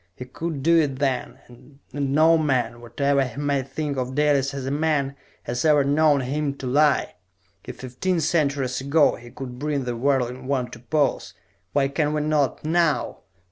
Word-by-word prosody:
He 125 - -8
could 155 +1 -5
do 165 +2 +5
it 140 -4 0
then 135 -3 -1
and 125 +3 -17 0.2
no 145 +4 +3
man, 125 -7 0
whatever 140 +4 +1
he 125 -1 -7
may 145 -1 0
think 140 +2 -4
of 130 0 -3
Dalis 145 -2 +2
as 140 -2 -5
a 135 - -2
man, 145 -2 0 0.3
has 120 0 -3
ever 150 -3 +4
known 145 0 +3
him 140 +2 -2
to 135 - -8
lie! 145 +2 +2 0.5
If, - - -9
fifteen 135 +8 -2
centuries 140 -5 0
ago, 140 +2 +3
he 120 0 -11
could 125 0 -8
bring 145 -1 -1
the 120 -1 -3
whirling 130 0 -1
world 125 -4 -1
to - - -9
pause, 145 +4 -1 0.4
why 140 -1 +2
can 150 +1 0
we 150 - 0
not, 150 -2 0
now...." 160 -4 +1
140 Hz, 180 wpm, -23 LUFS, 130-150 Hz, 0.5 s, do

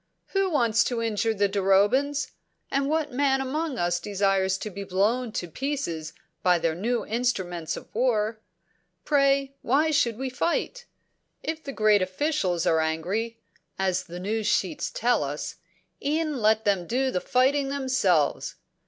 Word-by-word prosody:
"Who 390 -1 +1
wants 235 -8 +3
to 240 -2 -1
injure 225 0 0
the 200 0 +2
Durobans? 205 +9 +2 0.4
And 275 0 +1
what 310 -1 0
man 270 +1 +2
among 280 +2 -2
us 175 -2 +1
desires 195 -1 +1
to 215 - -6
be 200 +2 -6
blown 215 +6 0
to 175 - -3
pieces 170 - -3 0.3
by 180 -1 +4
their 165 -1 0
new 230 +7 -1
instruments 190 -9 -2
of - - -10
war? 220 -2 +1 0.7
Pray, 275 -1 +2
why 295 +6 +2
should 240 -7 +2
we 260 0 -3
fight? 345 - -1 0.6
If 320 0 -4
the 275 - -5
great 215 -4 +3
officials 185 - 0
are 160 - +3
angry, 180 +9 -1 0.4
as 185 -1 0
the 175 +1 -8
news 210 +3 -2
sheets 185 -6 0
tell 240 -9 +1
us, 145 +2 -5 0.5
e'en 305 0 0
let 220 +1 +3
them 195 -4 +1
do 260 +2 0
the 180 - -1
fighting 270 +6 +2
themselves." 255 - +1
225 Hz, 150 wpm, -26 LUFS, 190-275 Hz, 0.7 s, by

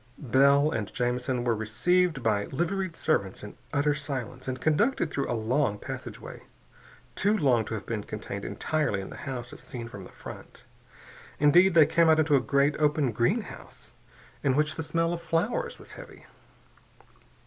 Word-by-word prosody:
Bell 140 +3 +4
and 110 -9 -3
Jamison 125 0 -1
were 120 -1 +2
received 135 +8 +1
by 105 -2 +1
liveried 175 +4 -2
servants 100 - -1
in 105 - -9 0.2
utter 145 0 +2
silence 130 -3 -5
and 130 0 -3
conducted 160 - +1
through 140 - -2
a 120 - 0
long 115 0 0
passageway, - - -8 0.7
too 205 +3 +1
long 125 - +2
to 110 - -4
have 105 - -6
been 110 -3 -3
contained - - -6
entirely 155 -11 -1
in 95 - -7
the - - -8
house 125 -2 -5
as - - -11
seen 120 -2 -7
from 100 -5 -9
the - - -13
front. - - -11 0.8
Indeed, 170 +5 +5
they 160 -2 +8
came 165 +1 +3
out 160 - +6
into 155 -2 +3
a - - +5
great 140 +3 +2
open 150 -3 +2
greenhouse, 185 - -3 0.5
in 135 -3 +2
which 150 +1 +1
the - - -3
smell 165 +2 0
of 170 - -4
flowers 190 - -1
was - - -13
heavy. - - -12
140 Hz, 170 wpm, -27 LUFS, 120-165 Hz, 0.8 s, they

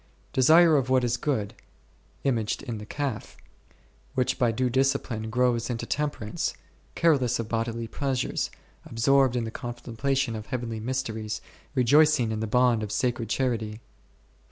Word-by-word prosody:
Desire 160 +4 +6
of 130 -2 0
what 130 -1 +3
is 120 0 +1
good 120 -6 -1 0.7
(imaged 115 -6 0
in 120 -5 -5
the 105 - -9
calf), 145 +1 -4 0.8
which 130 -1 0
by 120 -2 +3
due 125 +3 0
discipline 130 -3 0
grows 120 0 +1
into 115 -2 -3
Temperance, 145 -8 -2 0.4
careless 135 -8 +3
of 115 - -4
bodily 115 0 -2
pleasures, 135 0 -1 0.3
absorbed 130 +2 +3
in 120 - 0
the 110 - -4
contemplation 120 +1 -2
of 110 0 -7
heavenly 120 -4 -3
mysteries, 110 -3 -3 0.4
rejoicing 130 -1 +4
in 110 - -2
the 110 - -2
bond 125 0 +3
of 105 -1 -4
sacred 120 0 -1
charity; 115 -4 -1
4. 110 - -11
120 Hz, 145 wpm, -27 LUFS, 115-135 Hz, 0.8 s, Desire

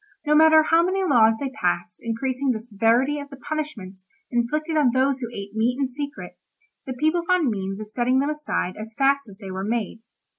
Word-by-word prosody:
No 300 - +2
matter 315 0 +7
how 330 +2 +4
many 375 +2 0
laws 225 -9 +4
they 275 -2 -3
passed 175 -7 -2
increasing 255 +4 -2
the 235 -4 0
severity 230 +6 +1
of 285 0 -8
the 275 - -11
punishments 225 -11 -6 0.2
inflicted 305 +7 -1
on 295 -5 +4
those 265 +1 +2
who 240 - -4
ate 200 -2 -8
meat 235 +3 +1
in 270 -2 0
secret, 285 +2 -7 0.5
the 260 - -3
people 310 +7 +1
found 360 -8 +2
means 195 -1 -4
of 215 - -7
setting 245 +4 0
them 280 +3 +1
aside 300 -11 -2
as 220 +1 -7
fast 275 -2 +2
as 195 - -11
they 195 -3 -8
were 190 +1 -4
made. 225 0 -2
255 Hz, 200 wpm, -23 LUFS, 220-295 Hz, 0.5 s, matter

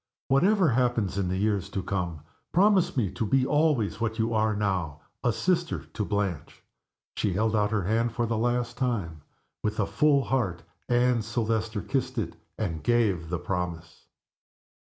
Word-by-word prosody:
Whatever 180 +6 +4
happens 120 -6 +1
in 95 -2 0
years 100 +1 0
to 95 - -3
come 90 -5 -3 0.3
promise 190 -3 +3
me 105 -7 +1
to - - -3
be 130 +4 +2
always, 145 -8 +1
what 110 -1 -1
you 115 0 0
are 110 -1 +2
now, 90 -8 -1 0.2
a 120 - +3
sister 175 +7 0
to 105 - -4
Blanche." 100 -7 -3 0.5
She 100 - 0
held 110 +3 +1
out 105 -1 +2
her 105 -2 0
hand 115 +5 +1
for 120 +1 -1
the 115 0 -1
last 120 0 0
time. 100 - -2 0.4
With 105 0 -2
a 105 - +3
full 145 +2 +3
heart 100 -12 -1 0.3
Anne 120 -1 +3
Silvester 110 -1 -1
kissed 130 -1 -2
it, 110 - -2 0.2
and 85 -8 -3
gave 105 -9 +1
the 90 - -1
promise. 90 -2 -5
110 Hz, 160 wpm, -27 LUFS, 95-125 Hz, 0.5 s, Whatever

